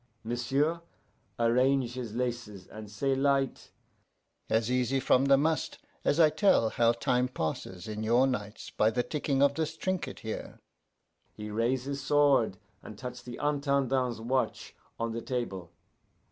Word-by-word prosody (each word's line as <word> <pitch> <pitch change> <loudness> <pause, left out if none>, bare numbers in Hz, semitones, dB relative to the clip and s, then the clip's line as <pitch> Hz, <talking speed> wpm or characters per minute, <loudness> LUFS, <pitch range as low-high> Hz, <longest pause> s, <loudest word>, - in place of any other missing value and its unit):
M'sieu' 135 +8 0 0.6
arrange 125 +2 +2
his 120 -4 -6
laces, 115 -6 -3
and 110 -1 -10
say 135 +7 0
light, 135 0 0 0.8
'As 110 +2 +1
easy 125 +1 +1
from 130 +1 +3
the 140 0 +6
must 155 +3 0 0.3
as 145 - +2
I 155 -2 +6
tell 155 - +3
how 115 0 +3
time 125 +2 +1
passes 90 -4 -4
in 105 0 -4
your 120 +4 +4
nights 105 -5 -4
by 110 - +3
the 125 +2 0
ticking 140 -2 0
of 140 0 +4
this 160 +1 -3
trinket 185 +1 -3
here.' 110 -1 -6 0.7
He 105 0 -7
raise 120 +4 0
his 140 0 -4
sword 140 -8 +3 0.2
and 105 - -10
touch 125 0 -7
the 120 -1 -8
Intendant's 140 -4 0
watch 130 +3 -2 0.3
on 115 0 -1
the 115 +1 -4
table. 105 -10 -4
125 Hz, 145 wpm, -29 LUFS, 115-140 Hz, 0.8 s, the